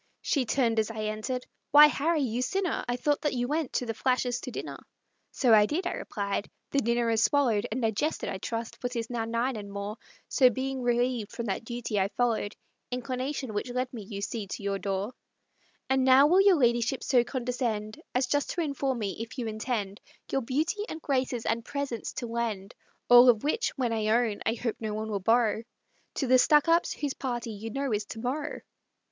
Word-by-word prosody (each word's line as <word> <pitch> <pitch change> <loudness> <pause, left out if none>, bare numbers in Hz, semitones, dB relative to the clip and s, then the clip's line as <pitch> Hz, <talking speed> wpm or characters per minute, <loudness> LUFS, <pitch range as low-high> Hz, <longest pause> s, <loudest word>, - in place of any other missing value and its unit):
She 275 -4 +1
turned 230 -1 +1
as 220 - 0
I 220 -1 -4
entered 215 +4 -3 0.2
"Why, 295 +1 +10
Harry, 300 +1 +1
you 245 -1 -1
sinner, 375 +7 -1
I 245 - 0
thought 290 +4 0
that 295 - 0
you 245 0 0
went 300 -1 -1
to 250 - 0
the 225 - -2
Flashers' 250 +1 0
to - - -6
dinner!" - - -6 0.5
"So 245 -4 +3
I 210 -1 +7
did," 355 - -2
I - - 0
replied; 200 0 -3 0.2
"the 280 - +2
dinner 235 -2 +1
is 225 -1 +3
swallowed, 230 -3 +2
And 240 +2 -2
digested, 225 +8 0
I 190 - -4
trust, 230 +3 -5
for 245 - -1
'tis 235 -1 -4
now 230 -2 -1
nine 235 +2 -1
and 200 -1 -7
more, 200 +2 -5 0.3
So, 255 -3 +5
being 260 +2 -3
relieved 240 -2 0
from 235 - -5
that 205 +2 -3
duty, 235 -3 -2
I 190 - +2
followed 220 0 -1 0.3
Inclination, 255 0 -3
which 205 +4 -2
led 250 +1 -2
me, 230 - -6
you 200 0 -7
see, 205 0 -4
to 200 - -6
your 200 0 -1
door; 200 +4 -2 0.7
And 265 0 +2
now 260 +2 +7
will 360 +6 +5
your 395 -2 +6
ladyship 240 0 +2
so 250 -3 +4
condescend 240 -4 -3
As 250 +1 +3
just 290 +3 0
to 345 - 0
inform 280 -4 -1
me 205 -4 -3
if 230 +4 -7
you 245 - -2
intend 215 -2 -3 0.3
Your 270 - +1
beauty, 315 - -1
and 320 - -5
graces, 255 -5 -1
and 230 +1 0
presence 275 -3 -4
to 245 - -4
lend 230 -4 -3 0.3
(All 245 +1 +9
of 225 -3 +4
which, 310 +11 +1
when 245 -4 0
I 215 -1 -1
own, 225 -1 +2
I 225 - +2
hope 230 -1 -3
no 215 -2 -3
one 220 0 -4
will 200 - -1
borrow) 225 +2 +2 0.5
To 275 - -1
the 255 0 +5
Stuckups', 330 +5 +4
whose 285 -2 -2
party, 240 -3 -4
you 215 +2 -6
know, 270 +1 -2
is 210 0 -1
to 225 - -8
morrow?" 280 +6 -3
240 Hz, 205 wpm, -28 LUFS, 220-265 Hz, 0.7 s, Why